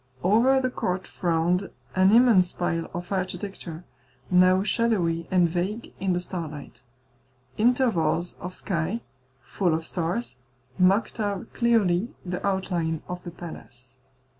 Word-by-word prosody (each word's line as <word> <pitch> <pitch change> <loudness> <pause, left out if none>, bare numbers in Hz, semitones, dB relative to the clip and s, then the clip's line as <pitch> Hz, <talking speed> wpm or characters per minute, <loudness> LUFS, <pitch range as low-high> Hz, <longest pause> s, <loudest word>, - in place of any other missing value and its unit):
Over 235 +8 +4
the 255 -1 -1
court 185 -5 -2
frowned 175 +2 0 0.3
an 190 +1 +5
immense 225 -6 +5
pile 165 -2 -2
of 175 +2 -6
architecture, 185 -3 -4 0.5
now 185 +1 +5
shadowy 185 -8 +1
and 180 -2 +4
vague 185 +7 -3
in 190 -1 +1
the 175 - 0
starlight. 155 -8 -6 0.8
Intervals 200 -9 +2
of 180 +1 -6
sky, 190 +4 -2 0.4
full 175 +4 0
of 160 0 -4
stars, 130 -10 -3 0.4
marked 195 +6 +3
out 205 -3 -3
clearly 225 -4 +2 0.2
the 180 0 -4
outline 180 -5 -1
of 180 0 -6
the - - -6
palace. 130 -7 -11
180 Hz, 125 wpm, -26 LUFS, 170-200 Hz, 0.8 s, an